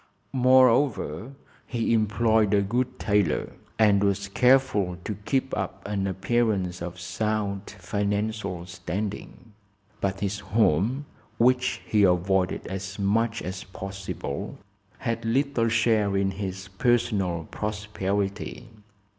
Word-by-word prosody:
Moreover, 125 Hz, -, +3 dB, 0.3 s
he 115 Hz, -1 st, 0 dB
employed 110 Hz, -1 st, +3 dB
a 100 Hz, -, +3 dB
good 125 Hz, +5 st, -1 dB
tailor 100 Hz, -7 st, +1 dB, 0.2 s
and 105 Hz, -2 st, +4 dB
was 100 Hz, 0 st, 0 dB
careful 115 Hz, -6 st, +3 dB
to 105 Hz, -, -3 dB
keep 130 Hz, +6 st, -1 dB
up 95 Hz, -1 st, -4 dB
an 100 Hz, -1 st, -1 dB
appearance 95 Hz, -3 st, 0 dB
of 90 Hz, +1 st, -6 dB
sound 105 Hz, +1 st, -2 dB
financial 100 Hz, -1 st, -2 dB
standing. 105 Hz, +4 st, -5 dB, 0.5 s
But 100 Hz, -1 st, -2 dB
his 100 Hz, -1 st, -1 dB
home, 105 Hz, -, +1 dB, 0.3 s
which 125 Hz, +2 st, +2 dB
he 105 Hz, -, +2 dB
avoided 90 Hz, 0 st, +2 dB
as 95 Hz, 0 st, -5 dB
much 115 Hz, +3 st, +1 dB
as 95 Hz, +1 st, -5 dB
possible, 95 Hz, +1 st, -6 dB, 0.4 s
had 115 Hz, -2 st, -2 dB
little 120 Hz, 0 st, +1 dB
share 110 Hz, -3 st, +2 dB
in 95 Hz, 0 st, +1 dB
his 95 Hz, -1 st, -5 dB
personal 95 Hz, -5 st, 0 dB
prosperity. 105 Hz, +1 st, -3 dB
105 Hz, 110 wpm, -26 LUFS, 95-115 Hz, 0.5 s, and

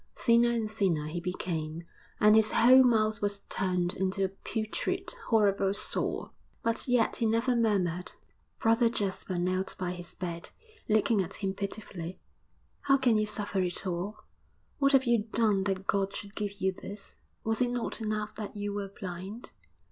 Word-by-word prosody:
Thinner 235 Hz, 0 st, +4 dB
and 225 Hz, -3 st, -1 dB
thinner 185 Hz, -8 st, +1 dB
he 155 Hz, +3 st, -3 dB
became, 170 Hz, -2 st, -3 dB, 0.4 s
and 210 Hz, 0 st, +6 dB
his 220 Hz, -1 st, +4 dB
whole 255 Hz, +3 st, +7 dB
mouth 215 Hz, -3 st, +2 dB
was 200 Hz, -1 st, -1 dB
turned 180 Hz, -2 st, 0 dB
into 190 Hz, +1 st, -1 dB
a -, -, -2 dB
putrid, 215 Hz, -, -3 dB
horrible 200 Hz, -3 st, +3 dB
sore. -, -, -1 dB, 0.3 s
But 230 Hz, +3 st, -1 dB
yet 245 Hz, -3 st, +2 dB
he 230 Hz, -, +1 dB
never 230 Hz, +3 st, +2 dB
murmured. 185 Hz, -6 st, 0 dB, 0.4 s
Brother 230 Hz, +1 st, +3 dB
Jasper 195 Hz, -4 st, -2 dB
knelt 185 Hz, +2 st, -1 dB
by 180 Hz, -1 st, -2 dB
his 175 Hz, -1 st, -8 dB
bed, 170 Hz, -2 st, -5 dB, 0.4 s
looking 215 Hz, 0 st, +3 dB
at 185 Hz, +1 st, -5 dB
him 195 Hz, -2 st, -2 dB
pitifully. 195 Hz, -3 st, -6 dB, 0.6 s
'How 275 Hz, -1 st, +4 dB
can 245 Hz, -5 st, +3 dB
you 215 Hz, -, 0 dB
suffer 205 Hz, -2 st, -1 dB
it 180 Hz, +1 st, -1 dB
all? 185 Hz, +4 st, -3 dB, 0.6 s
What 275 Hz, 0 st, +3 dB
have 270 Hz, -1 st, +5 dB
you 235 Hz, -3 st, +2 dB
done 210 Hz, -4 st, +3 dB
that 195 Hz, -1 st, -2 dB
God 195 Hz, 0 st, 0 dB
should 200 Hz, 0 st, -7 dB
give 205 Hz, -2 st, -2 dB
you 190 Hz, 0 st, +2 dB
this? 200 Hz, +2 st, -10 dB, 0.3 s
Was 225 Hz, +2 st, 0 dB
it 245 Hz, -, +3 dB
not 245 Hz, -1 st, -3 dB
enough 215 Hz, -1 st, -2 dB
that 215 Hz, -1 st, -6 dB
you 205 Hz, 0 st, -3 dB
were 200 Hz, -1 st, -4 dB
blind?' 190 Hz, +4 st, -7 dB
205 Hz, 165 wpm, -30 LUFS, 185-225 Hz, 0.6 s, whole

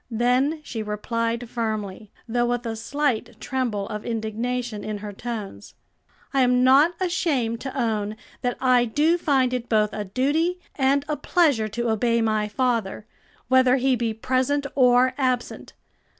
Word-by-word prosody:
Then 250 Hz, +6 st, +1 dB
she 230 Hz, -6 st, -5 dB
replied 230 Hz, +3 st, -2 dB
firmly, 215 Hz, -3 st, -4 dB, 0.2 s
though 240 Hz, +1 st, +1 dB
with 245 Hz, 0 st, -2 dB
a 225 Hz, -1 st, -3 dB
slight 265 Hz, +1 st, -2 dB
tremble 235 Hz, -7 st, -2 dB
of 210 Hz, 0 st, -5 dB
indignation 230 Hz, 0 st, -3 dB
in 215 Hz, -1 st, -4 dB
her 205 Hz, 0 st, -7 dB
tones: 220 Hz, -2 st, -7 dB, 0.6 s
"I 270 Hz, -, +3 dB
am 250 Hz, 0 st, +3 dB
not 285 Hz, +7 st, +5 dB
ashamed 290 Hz, -11 st, 0 dB
to 270 Hz, 0 st, -6 dB
own 215 Hz, -3 st, -1 dB, 0.3 s
that 245 Hz, -2 st, -1 dB
I 250 Hz, -2 st, +4 dB
do 305 Hz, +9 st, +2 dB
find 265 Hz, -5 st, +2 dB
it 245 Hz, -1 st, -3 dB
both 215 Hz, -2 st, +2 dB
a 210 Hz, -, -3 dB
duty 295 Hz, -, 0 dB, 0.2 s
and 275 Hz, +1 st, +2 dB
a 300 Hz, -, -1 dB
pleasure 295 Hz, -11 st, +2 dB
to 230 Hz, +2 st, -2 dB
obey 230 Hz, +1 st, +1 dB
my 215 Hz, -2 st, +1 dB
father, 225 Hz, -3 st, -1 dB, 0.4 s
whether 260 Hz, 0 st, +5 dB
he 265 Hz, 0 st, +2 dB
be 235 Hz, -1 st, -1 dB
present 260 Hz, +5 st, 0 dB
or 255 Hz, -1 st, +4 dB
absent. 255 Hz, -2 st, -2 dB
245 Hz, 150 wpm, -24 LUFS, 220-265 Hz, 0.6 s, not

